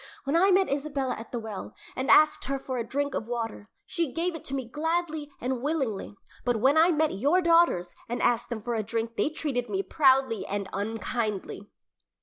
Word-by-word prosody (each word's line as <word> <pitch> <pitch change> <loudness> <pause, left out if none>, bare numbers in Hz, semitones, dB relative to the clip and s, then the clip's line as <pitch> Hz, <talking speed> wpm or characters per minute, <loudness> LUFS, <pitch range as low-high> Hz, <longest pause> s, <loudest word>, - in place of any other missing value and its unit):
When 280 +3 -1
I 375 +4 +5
met 380 0 +4
Isabella 280 -2 -1
at 225 - -9
the 245 - -3
well 220 -4 -6 0.2
and 260 +1 -2
asked 305 0 +5
her 275 +1 -1
for 260 -2 -4
a - - -1
drink 285 +4 -2
of 220 - -3
water, 225 -3 -4 0.2
she 335 -7 -1
gave 340 +4 -1
it 325 - -7
to 275 - -3
me 260 -3 -3
gladly 315 +2 -2
and 250 0 -2
willingly, 265 -9 -2 0.3
but 245 -1 +1
when 265 +6 +4
I 325 +2 +6
met 315 -2 +2
your 285 - +3
daughters 335 - +3 0.2
and 240 - -2
asked 235 - +1
them 225 -3 -5
for 240 0 -2
a 225 - 0
drink 225 +2 -3
they - - +1
treated 280 -6 -3
me 390 0 -1
proudly 265 - +3
and 200 -1 -3
unkindly." 215 -1 -3
265 Hz, 200 wpm, -27 LUFS, 230-310 Hz, 0.3 s, I